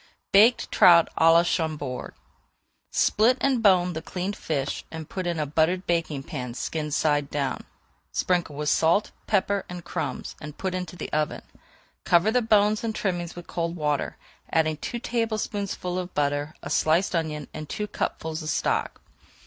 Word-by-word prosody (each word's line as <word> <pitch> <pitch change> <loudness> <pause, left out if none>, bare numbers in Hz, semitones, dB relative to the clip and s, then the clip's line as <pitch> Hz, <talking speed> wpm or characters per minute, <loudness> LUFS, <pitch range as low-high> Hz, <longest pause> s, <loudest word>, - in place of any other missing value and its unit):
BAKED 220 +5 +5
TROUT 170 -2 +7
À 165 0 +6
LA 170 +1 +6
CHAMBORD 155 -7 -2 0.7
Split 235 +5 +3
and 265 -4 +2
bone 180 -4 +4
the 160 - -4
cleaned 185 +4 -4
fish 140 -3 -3
and 160 -2 -7
put 185 -2 -4
in 170 -2 -1
a 150 - 0
buttered 160 +5 +1
baking 165 -5 -1
pan 125 -3 -6
skin 155 +3 -3
side 145 -1 +1
down. 140 -2 -2 0.5
Sprinkle 175 -5 0
with 150 +1 -3
salt, 170 +6 +3 0.2
pepper, 200 -1 +1
and 180 -1 -7
crumbs, - - -4
and 150 -1 -8
put 190 -1 -2
into 180 -2 -4
the - - -7
oven. 150 0 -1 0.6
Cover 175 +5 +4
the 250 +2 +3
bones 215 -1 +3
and 220 -1 -2
trimmings 175 -3 -2
with 175 -1 -9
cold 170 0 -3
water, 150 -3 -1 0.3
adding 155 -1 +2
two 235 - -4
tablespoonfuls 215 -6 -2
of 180 0 -6
butter, 145 +1 0
a - - -5
sliced 165 +6 +2
onion, 155 -3 -2
and 155 -1 -7
two 210 - -3
cupfuls 160 -5 -3
of 155 - -4
stock. - - -1
170 Hz, 165 wpm, -26 LUFS, 155-195 Hz, 0.7 s, TROUT